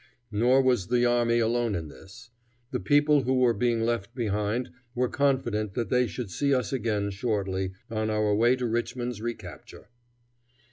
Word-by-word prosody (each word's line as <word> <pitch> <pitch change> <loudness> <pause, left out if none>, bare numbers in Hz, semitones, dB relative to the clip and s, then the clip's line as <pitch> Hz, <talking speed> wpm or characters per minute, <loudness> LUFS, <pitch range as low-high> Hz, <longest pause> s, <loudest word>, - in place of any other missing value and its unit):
Nor 125 +6 +3
was 125 -8 +2
the 120 0 +2
army 120 -1 +2
alone 115 -1 +1
in 80 -2 -4
this. 115 +9 -14 0.4
The 125 - -1
people 145 0 +3
who 130 +1 0
were 125 -2 +4
being 120 -1 0
left 115 -1 -2
behind 110 +1 -1 0.2
were 125 +1 +1
confident 120 -8 0
that 120 -2 -2
they 125 -1 +3
should 115 -6 -6
see 140 +7 +1
us 130 +1 -2
again 105 -5 -1
shortly, 95 -3 -2 0.2
on 110 -1 -1
our 105 -1 +1
way 120 +4 +4
to 125 -1 -3
Richmond's 120 0 -2
recapture. 120 0 -8
120 Hz, 160 wpm, -27 LUFS, 105-125 Hz, 0.4 s, were